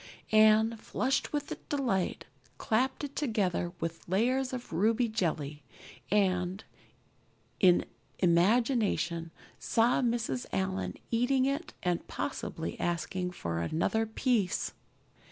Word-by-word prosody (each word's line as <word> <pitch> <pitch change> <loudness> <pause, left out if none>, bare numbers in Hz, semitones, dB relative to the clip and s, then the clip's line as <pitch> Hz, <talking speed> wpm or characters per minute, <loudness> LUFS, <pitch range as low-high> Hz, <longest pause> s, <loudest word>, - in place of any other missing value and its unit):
Anne, 220 +1 +5
flushed 265 +4 -1
with 290 -1 -2 0.2
delight, 240 -11 0 0.3
clapped 255 +6 0
it 285 -1 -5
together 200 - 0
with 165 +1 -5
layers 255 +7 +1
of 250 -8 -6
ruby 225 +7 +2
jelly 155 -8 -2 0.5
and, 185 -1 +1 1.0
in 180 -3 +5 0.3
imagination, 185 -2 +2 0.3
saw 235 +3 +2
Mrs. 230 - -1
Allan 95 -1 -1 0.2
eating 250 +3 +2
it 280 +5 -2
and 180 -1 -1
possibly 85 - -4
asking 175 +2 -1
for 85 - -4
another 165 - 0
piece! 220 -4 0
210 Hz, 100 wpm, -30 LUFS, 175-245 Hz, 1.0 s, Anne